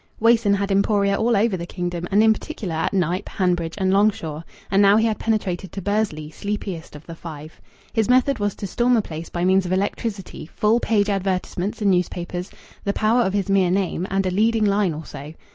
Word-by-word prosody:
Wason 225 -3 +4
had 200 0 -2
emporia 200 0 +2
all 225 +1 +2
over 215 0 +2
the 170 -1 -5
kingdom, 175 -1 -4
and 205 +2 +4
in 220 0 +6
particular 215 - -6
at 160 +1 -1
Knype, 185 0 -1
Hanbridge, 175 -3 -1
and 190 -1 +1
Longshaw. 195 -7 +1 0.3
And 195 +1 +4
now 200 +1 +6
he 220 - +3
had 220 -2 0
penetrated 190 -5 -1
to - - -4
Bursley, 200 -7 -1
sleepiest 195 -5 -5
of 150 - -12
the 165 - -8
Five. 160 -2 -10 0.3
His 225 -1 +1
method 255 0 +3
was 205 -1 -1
to - - -6
storm 240 +5 +2
a 220 - +1
place 160 -1 -7
by 175 0 -2
means 190 0 +3
of - - -4
electricity, 195 -2 -3
full 220 +2 +3
page 210 -4 +1
advertisements 195 0 -2
in 200 - +4
news 180 -1 +2
papers, 180 +1 -5 0.3
the 200 - 0
power 225 +4 +2
of 190 -4 0
his 200 -2 0
mere 195 -2 +3
name, 185 -1 -1
and 195 0 0
a 185 - 0
leading 220 +3 +2
line 200 -5 +1
or 155 +1 -7
so. 150 +3 -9
195 Hz, 210 wpm, -22 LUFS, 175-210 Hz, 0.3 s, in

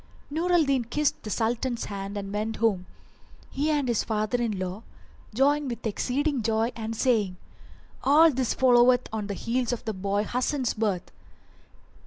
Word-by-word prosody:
Nur 335 +4 -1
al 350 -2 +5
Din 270 -4 +1
kissed 295 +5 0
the 215 - -7
Sultan's 235 +2 -1
hand 200 0 -5
and 195 0 -5
went 215 +2 -2
home, 200 -5 0 0.6
he 290 +3 -1
and 290 -3 +1
his 235 -3 +1
father 215 +2 -1
in 220 -4 -1
law, 185 +2 -4 0.5
joying 280 +5 +2
with 235 -2 -5
exceeding 265 +5 0
joy 225 +2 +1
and 225 0 -4
saying, 215 -7 +1 0.7
"All 310 +4 +6
this 255 -3 -1
followeth 245 0 +5
on 215 -2 -3
the 200 - -4
heels 245 +4 -1
of 245 0 -4
the 220 - -2
boy 200 +2 -1
Hasan's 250 +3 -1
birth!" 205 -5 -2
235 Hz, 165 wpm, -26 LUFS, 210-260 Hz, 0.7 s, All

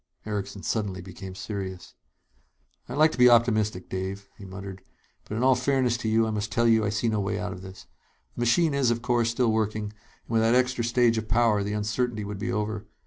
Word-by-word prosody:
Erickson 100 -2 -4
suddenly 105 -4 -2
became 95 +1 -9
serious. 95 -2 -6 1.0
"I'd 125 - -4
like 155 +1 +5
to - - -8
be 125 0 +8
optimistic, 110 -5 +2
Dave," 95 +2 -5
he 100 - -11
muttered, 95 0 -8 0.5
"but 105 - -4
in 120 - 0
all 130 0 +6
fairness 125 -1 +1
to 115 -2 -3
you 110 +1 +3
I 110 - -2
must 105 0 -3
tell 115 +3 +2
you 110 -1 +4
I 105 - 0
see 110 +2 -1
no 110 -2 +1
way 100 0 -1
out 105 -2 -3
of 90 - -10
this. 95 0 -11 0.5
The - - -8
machine 140 +7 +3
is, 140 -3 +2
of 120 0 -1
course, 120 -2 +2
still 115 0 +1
working, 110 -1 -1
and 105 - -31
with 115 -1 +1
that 115 +2 +3
extra 125 -1 +1
stage 115 -1 +3
of 110 - -7
power, 110 -2 +3
the 100 +1 -2
uncertainty 105 +1 -1
would 100 -1 -6
be - - -2
over. 105 0 -3
110 Hz, 220 wpm, -26 LUFS, 100-120 Hz, 1.0 s, be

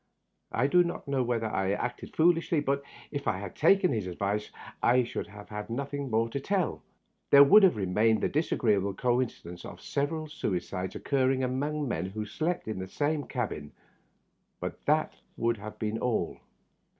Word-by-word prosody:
I 125 - +1
do 175 +6 +5
not 170 -3 -5
know 140 -2 +1
whether 120 -2 0
I 95 -3 0
acted 125 +4 -4
foolishly, 165 -1 +3
but 140 -1 0 0.3
if 140 -1 -4
I 100 - +1
had 100 -1 -7
taken 195 -2 +4
his 105 -5 -2
advice 100 +4 -2 0.3
I 125 +1 +4
should 120 - -4
have 105 0 -12
had 105 0 -6
nothing 140 +3 -3
more 115 0 +2
to 140 - -3
tell. 190 +3 -1 0.5
There 140 0 +9
would 205 +10 +8
have 190 -2 +5
re 100 -3 -1
mained 110 +4 +3
the - - +2
disagreeable 105 - +1
coincidence 120 -8 -1
of - - -9
several 155 +3 -2
suicides 95 - -3
occurring 130 -1 +1
among 145 +3 -1
men 90 -6 -2
who 105 +3 -5
had 105 - -6
slept 170 -2 -2
in 110 -4 -3
the 95 - -5
same 145 +7 -1
cabin, 105 - -4 0.9
but - - -5
that - - +2 0.2
would 115 0 +1
have 110 +1 -8
been 110 +1 -2
all. 120 -2 -1
120 Hz, 175 wpm, -29 LUFS, 105-145 Hz, 0.9 s, There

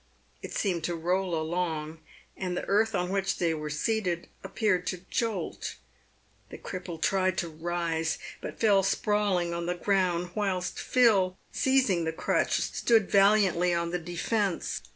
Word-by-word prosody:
It - - -7
seemed 180 -5 0
to 175 - -1
roll 175 +1 0
along, 160 -1 -2 0.4
and 180 -2 -3
the - - -3
earth 220 +2 +2
on 180 0 -1
which 195 0 0
they 170 -2 +1
were 150 -1 -4
seated 175 +2 -1 0.2
ap - - -10
peared 185 -5 +1
to 185 0 -4
jolt. 220 -7 -2 0.7
The - - -8
cripple 180 -3 -7
tried 185 +2 +1
to 170 - -1
rise, 165 0 -2 0.2
but - - -7
fell 205 -3 +5
sprawling 195 -3 +1
on 170 0 -3
the 180 - 0
ground, 180 -2 0
whilst 185 -4 -2
Phil, 200 -7 +3
seizing 255 -11 +2
the 160 - -1
crutch, - - +1
stood 225 -4 +2
valiantly 195 -3 +4
on 170 0 -1
the 180 - -1
defence. 175 - -2
180 Hz, 150 wpm, -28 LUFS, 170-200 Hz, 0.7 s, fell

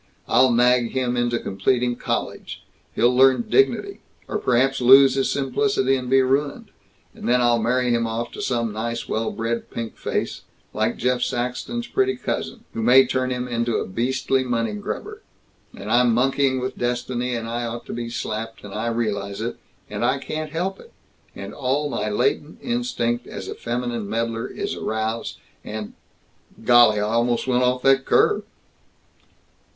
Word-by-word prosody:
I'll 130 -1 +4
nag 120 0 +3
him 125 -2 0
into 120 -1 +1
completing 120 +5 0
college. - - -4 0.3
He'll 120 +2 +3
learn 135 - +5
dignity 400 - +2 0.3
or - - -2
perhaps 130 +2 +2
lose 135 +2 +8
his 135 0 0
simplicity 135 -1 +1
and 125 -1 -4
be 135 0 +5
ruined; 140 +2 -1 0.4
and - - -5
then 125 +1 +4
I'll 120 -1 +3
marry 125 +2 +1
him 115 -1 +1
off 115 +1 -3
to - - -7
some 115 -3 -1
nice 115 +1 -3
well 110 0 -1
bred 115 +1 -3
pink 115 -1 -6
face, - - -3 0.3
like - - 0
Jeff 125 0 0
Saxton's 125 - -2
pretty 390 +9 +1
cousin 230 - -4
who 115 - -3
may 125 +4 +6
turn 130 0 -1
him 125 0 -3
into 120 -1 -1
a - - -2
beastly 130 +5 0
money 115 -3 -1
grubber; 105 - -6 0.6
and 105 +3 -6
I'm 120 -1 +4
monkeying 130 +1 +2
with 130 +1 -4
destiny, 120 0 -1
and 115 -1 -4
I 120 +1 -3
ought 120 0 -5
to - - -7
be 120 0 -4
slapped, 115 -1 -5
and 100 -1 -9
I 110 +2 -2
realize 100 -4 -2
it, - - -4 0.3
and - - -4
I 130 +3 +2
can't 155 +3 -5
help 180 +5 -3
it, 470 - -15 0.4
and - - -7
all 140 +3 -1
my 105 - -2
latent 145 +8 0
instinct 240 - -1
as - - -7
a - - -4
feminine 120 -3 -3
meddler 115 +1 -2
is - - -4
aroused, 110 +1 -3 0.3
and 105 -1 -6 0.7
golly, 120 -3 +6
I - - 0
almost 115 +2 +1
went 125 -1 +2
off 125 0 +1
that 135 0 +4
curve!" - - +3
120 Hz, 165 wpm, -23 LUFS, 115-130 Hz, 0.7 s, lose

